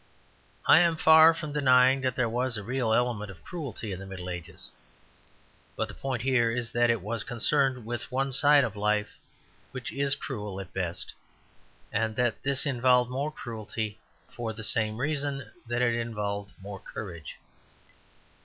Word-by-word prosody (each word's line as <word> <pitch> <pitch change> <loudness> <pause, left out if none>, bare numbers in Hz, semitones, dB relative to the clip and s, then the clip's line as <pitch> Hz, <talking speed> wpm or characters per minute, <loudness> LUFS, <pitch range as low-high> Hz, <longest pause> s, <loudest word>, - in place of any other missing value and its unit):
I - - +8
am 170 -2 +4
far 160 0 +8
from 155 -3 -5
denying 130 -2 +5
that 130 -1 -1
there 125 -3 +1
was 120 +1 -1
a 105 - -5
real 125 +1 -1
element 115 -3 +1
of 90 -3 -12
cruelty 140 - -6
in 95 - -5
the 95 - -8
Middle 90 -2 -6
Ages; 85 -1 -7 1.0
but - - -1
the - - -10
point 130 -4 -3
here 130 -3 +3
is 115 -1 -2
that 120 0 +3
it 115 -3 +2
was 115 +2 -3
concerned 130 0 +1
with 120 +2 -5
one 135 +1 0
side 145 +2 +5
of 110 -4 -3
life, 105 0 +1 0.6
which 130 -2 -6
is 140 0 +1
cruel 105 -7 -5
at 95 -2 -9
the - - -3
best; 90 -2 -3 0.8
and 110 +1 0
that 120 -2 0
this 135 -1 0
involved 125 -2 +3
more 140 +4 -2
cruelty 110 -5 -5 0.3
for 115 -2 -5
the 110 0 -8
same 110 -1 +1
reason 140 -3 -2 0.2
that 120 +1 0
it 120 -1 +3
involved 105 -3 -3
more 100 0 -8
courage. 85 -8 -8
120 Hz, 170 wpm, -28 LUFS, 105-135 Hz, 1.0 s, I